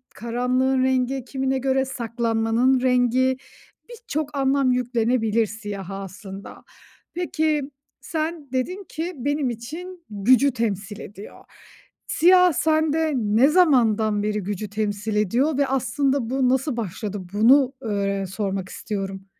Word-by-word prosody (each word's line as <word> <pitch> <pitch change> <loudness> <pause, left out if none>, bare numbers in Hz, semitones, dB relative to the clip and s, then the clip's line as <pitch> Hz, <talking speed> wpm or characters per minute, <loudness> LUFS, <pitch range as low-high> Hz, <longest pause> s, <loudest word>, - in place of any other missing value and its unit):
karanlığın 255 +3 0
rengi, 260 0 0
kimine 265 +1 -1
göre 265 0 +1
saklanmanın 235 0 0
rengi, 255 +1 +2 0.5
birçok 310 - -5
anlam 270 -1 +2
yüklenebilir 230 -2 +1
siyaha 200 -2 -7
aslında. 195 +1 -10 0.5
Peki, 315 -4 0 0.4
sen 315 -3 -4
dedin 365 +10 -2
ki, 335 +3 -4
“Benim 285 0 -1
için 330 +10 -8
gücü 245 +7 +3
temsil 210 -4 -3
ediyor.“ 205 +1 -11 0.6
Siyah 360 +1 +5
sende 315 0 +1
ne 225 +2 +3
zamandan 225 - +3
beri 210 0 -1
gücü 205 +1 -4
temsil 210 0 -2
ediyor 245 +9 +1
ve 280 - +2
aslında 270 -1 0
bu 260 -1 +1
nasıl 265 0 0
başladı? 205 -1 -4
Bunu, 260 +5 +5
ııı, 215 -2 -2 0.3
öğ - - -3
sormak 195 -1 -3
istiyorum. 195 -2 -5
250 Hz, 120 wpm, -23 LUFS, 215-280 Hz, 0.6 s, Siyah